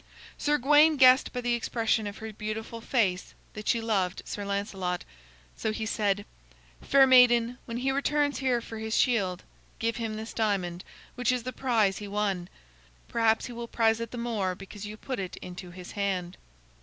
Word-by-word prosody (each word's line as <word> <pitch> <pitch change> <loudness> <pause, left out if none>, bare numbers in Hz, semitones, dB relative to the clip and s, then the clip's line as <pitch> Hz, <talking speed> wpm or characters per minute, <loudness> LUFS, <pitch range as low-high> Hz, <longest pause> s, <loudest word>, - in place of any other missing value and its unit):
Sir 295 0 +1
Gawain 295 +3 +5
guessed 255 0 +6
by 250 - -3
the 245 0 0
expression 225 -2 0
of 205 - -7
her 220 0 -7
beautiful 220 +2 -5
face 200 -7 0 0.2
that 215 0 -8
she 235 - +3
loved 195 -5 -1
Sir 205 - -5
Lancelot. 200 -3 -3 0.5
So 220 - -2
he 220 0 -3
said: 205 -2 0 0.6
"Fair 275 -1 +5
maiden, 245 -2 +5
when 230 -1 -5
he 265 +2 0
returns 285 +1 +1
here 255 -3 +1
for 225 -1 -8
his 220 0 -1
shield, 195 -8 +1 0.3
give 230 0 -1
him 225 -2 -3
this 220 +1 -6
diamond, 185 -5 -1 0.3
which 250 +1 +1
is 250 -2 -1
the 255 +1 -5
prize 220 -7 +1
he 205 - -6
won. 200 -3 -1 0.6
Perhaps 225 -1 +2
he 245 - -7
will 235 0 -6
prize 225 -1 +2
it 230 -1 -4
the 245 - -8
more 215 -6 -1
because 200 +2 -9
you 210 +1 -8
put 255 +1 -5
it 185 -2 -5
into 180 0 -8
his 180 0 -10
hand." 190 -3 -2
220 Hz, 180 wpm, -28 LUFS, 200-245 Hz, 0.6 s, guessed